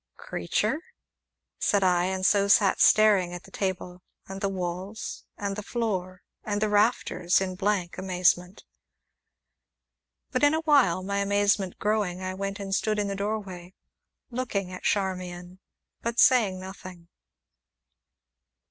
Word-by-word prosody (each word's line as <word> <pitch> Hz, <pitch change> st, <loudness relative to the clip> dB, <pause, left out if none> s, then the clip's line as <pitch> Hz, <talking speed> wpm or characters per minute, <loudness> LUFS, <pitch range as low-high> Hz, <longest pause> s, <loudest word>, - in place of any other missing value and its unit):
"Creature?" 215 Hz, -, -1 dB, 0.8 s
said 200 Hz, -1 st, +2 dB
I, 180 Hz, -1 st, +3 dB
and 190 Hz, 0 st, -2 dB
so 200 Hz, 0 st, +4 dB
sat 200 Hz, -1 st, +4 dB
staring 200 Hz, -5 st, +5 dB
at 175 Hz, -, -9 dB
the 195 Hz, -, -16 dB
table, 180 Hz, -2 st, -4 dB, 0.3 s
and 195 Hz, 0 st, -7 dB
the 195 Hz, -, 0 dB
walls, 185 Hz, +2 st, -5 dB
and 200 Hz, -1 st, -3 dB
the 210 Hz, -, -4 dB
floor, 190 Hz, -5 st, -3 dB, 0.2 s
and 205 Hz, -1 st, -2 dB
the 215 Hz, 0 st, 0 dB
rafters 205 Hz, -4 st, +2 dB
in 190 Hz, -1 st, -2 dB
a -, -, -8 dB
blank 190 Hz, -3 st, -1 dB
amazement. 180 Hz, 0 st, 0 dB, 1.7 s
But 255 Hz, +2 st, -1 dB
in 290 Hz, +2 st, +5 dB
a 320 Hz, -, -1 dB
while, 275 Hz, -, +3 dB
my 200 Hz, +1 st, -2 dB
amazement 200 Hz, -1 st, +1 dB
growing, 205 Hz, -4 st, -1 dB
I 185 Hz, 0 st, -4 dB
went 195 Hz, +1 st, -4 dB
and 195 Hz, -1 st, -4 dB
stood 215 Hz, +2 st, 0 dB
in 205 Hz, -1 st, -1 dB
the 200 Hz, -, -3 dB
doorway, 195 Hz, -3 st, -5 dB, 0.6 s
looking 225 Hz, -7 st, -3 dB
at 185 Hz, -, -8 dB
Charmian, 185 Hz, -2 st, -2 dB, 0.4 s
but 235 Hz, 0 st, -3 dB
saying 220 Hz, -8 st, +4 dB
nothing. 185 Hz, -2 st, -10 dB
195 Hz, 140 wpm, -27 LUFS, 185-210 Hz, 1.7 s, staring